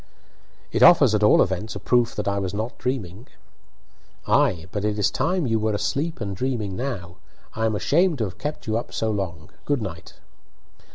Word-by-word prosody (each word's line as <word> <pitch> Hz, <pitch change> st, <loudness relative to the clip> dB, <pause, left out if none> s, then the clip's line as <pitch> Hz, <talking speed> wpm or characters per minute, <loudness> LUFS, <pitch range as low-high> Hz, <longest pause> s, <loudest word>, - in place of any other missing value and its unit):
"It 115 Hz, -, -1 dB
offers, 140 Hz, -4 st, +7 dB
at 105 Hz, -, +2 dB
all 105 Hz, -, +6 dB
events, 95 Hz, +4 st, -4 dB
a -, -, -4 dB
proof 120 Hz, -1 st, +1 dB
that -, -, -3 dB
I 100 Hz, 0 st, 0 dB
was 95 Hz, 0 st, -3 dB
not 110 Hz, +3 st, -3 dB
dreaming." 120 Hz, -5 st, -4 dB, 1.0 s
"Ay, 115 Hz, -, +2 dB
but 105 Hz, -, -3 dB
it 105 Hz, 0 st, 0 dB
is 105 Hz, 0 st, +2 dB
time 180 Hz, -1 st, 0 dB
you 115 Hz, -3 st, +1 dB
were 110 Hz, 0 st, 0 dB
asleep 150 Hz, +9 st, -2 dB
and 100 Hz, -3 st, -4 dB
dreaming 110 Hz, -4 st, -2 dB
now. 95 Hz, -9 st, -5 dB, 0.4 s
I 110 Hz, 0 st, 0 dB
am 110 Hz, -, -1 dB
ashamed 165 Hz, -, +2 dB
to 115 Hz, -, -1 dB
have 95 Hz, -4 st, -6 dB
kept 150 Hz, +1 st, -5 dB
you 110 Hz, 0 st, 0 dB
up 120 Hz, -, -5 dB
so 110 Hz, -1 st, -1 dB
long. 90 Hz, -7 st, -4 dB
Good 145 Hz, -5 st, 0 dB
night." -, -, -8 dB
110 Hz, 190 wpm, -23 LUFS, 100-130 Hz, 1.0 s, offers